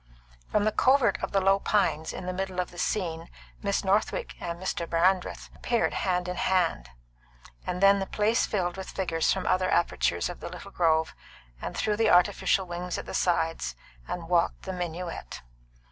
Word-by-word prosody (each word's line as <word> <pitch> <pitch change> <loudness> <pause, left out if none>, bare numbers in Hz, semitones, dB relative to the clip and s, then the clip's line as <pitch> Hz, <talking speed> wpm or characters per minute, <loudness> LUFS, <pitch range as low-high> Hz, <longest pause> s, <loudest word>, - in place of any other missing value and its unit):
From 210 - +2
the 215 - +2
covert 260 +2 +3
of - - -3
the 195 - +3
low 195 +1 +3
pines 195 -7 +1
in 185 - -7
the 185 - -2
middle 190 0 -3
of 180 - -2
the 175 - -10
scene 170 -5 -2 0.3
Miss 200 -1 0
Northwick 200 +2 0
and 170 0 -4
Mr. 175 -2 -3
Brandreth 180 +2 +1
appeared 235 -1 0
hand 180 -2 0
in 180 0 -4
hand, 175 - +1 0.8
and 180 +2 -2
then 200 0 +7
the 195 - -3
place 215 +2 +1
filled 180 -3 -1
with 190 - -6
figures 165 -4 0
from 190 - -1
other 185 0 +2
apertures 170 - +1
of 175 - -7
the - - -6
little 200 - -10
grove 160 -3 +2 0.5
and - - -5
through 210 -1 0
the 225 -1 +3
artificial 180 +2 +3
wings 175 0 -4
at - - -6
the - - -7
sides, 165 - 0 0.3
and 170 -2 -5
walked 170 -1 +1
the 190 - -4
minuet. 175 -1 -5
180 Hz, 180 wpm, -27 LUFS, 175-195 Hz, 0.8 s, then